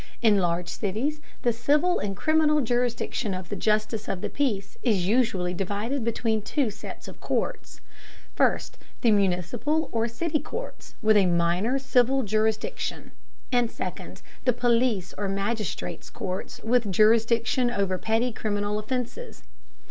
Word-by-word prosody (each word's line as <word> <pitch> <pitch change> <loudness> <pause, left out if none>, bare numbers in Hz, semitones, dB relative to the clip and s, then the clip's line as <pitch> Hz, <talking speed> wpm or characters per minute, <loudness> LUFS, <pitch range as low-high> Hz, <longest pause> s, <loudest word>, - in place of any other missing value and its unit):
In 215 -4 +4
large 175 -1 0
cities 240 +10 -2 0.2
the 240 - +3
civil 295 +9 +2
and 195 -1 -3
criminal 310 -1 +3
jurisdiction 240 -3 -1
of 185 -1 -7
the - - -3
justice 215 0 0
of 185 - -3
the - - -3
peace 220 -9 -1
is 205 -8 +1
usually 195 -5 +1
divided 205 +8 -2
between 225 -1 0
two 250 +2 0
sets 210 - -9
of - - -10
courts: - - -3 0.5
first, - - +1 0.2
the 235 - +4
municipal 205 - +1
or 230 0 +1
city 300 +7 -1
courts, 465 - -7
with 215 0 +5
a 195 -2 +5
minor 175 +8 +2
civil 265 0 +2
jurisdiction; 215 +1 -1 0.4
and 245 -2 +2
second, - - -7 0.2
the 250 - +3
police 235 -5 +1
or 200 -1 -1
magistrates' 200 +1 -3
courts 185 -1 -5
with 230 -3 +2
jurisdiction 230 +4 +3
over 195 -5 0
petty 225 +3 +1
criminal 210 -1 -1
offenses. 245 - -4
225 Hz, 140 wpm, -26 LUFS, 200-245 Hz, 0.5 s, with